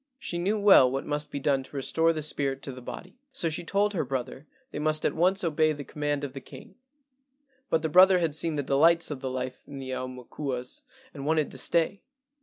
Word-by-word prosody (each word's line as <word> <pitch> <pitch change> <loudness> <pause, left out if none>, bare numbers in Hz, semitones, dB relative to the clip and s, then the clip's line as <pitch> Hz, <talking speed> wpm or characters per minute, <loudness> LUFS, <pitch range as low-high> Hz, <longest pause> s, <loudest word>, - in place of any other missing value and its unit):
She 175 -9 -4
knew 200 +5 0
well 195 -11 +7
what 135 +1 -3
must 150 0 -2
be 140 - -4
done 135 -1 +1
to 135 - -14
restore 160 +4 +2
the 155 -2 -3
spirit 140 -2 -2
to 135 - -5
the 130 0 -10
body, 185 - -9
so 170 -9 -1
she 160 +3 -4
told 205 +4 +1
her 175 - 0
brother 130 +2 -5 0.2
they - - -5
must 155 0 0
at - - +2
once 185 +4 +2
obey 155 -1 +2
the 145 -1 -7
command 145 +1 -2
of 140 -2 -4
the 135 - -7
king; - - -13 1.0
but 160 -1 +1
the - - +1
brother 185 +4 +7
had 165 -4 0
seen 160 +1 -1
the 145 - -1
delights 165 +5 +3
of 145 - -4
the 130 0 -4
life 130 0 -4
of 140 - -9
the 130 -1 -6
aumakuas 130 - -5 0.3
and 140 -1 -6
wanted 155 -1 +1
to - - -8
stay. 170 +8 +1
150 Hz, 220 wpm, -27 LUFS, 135-165 Hz, 1.0 s, well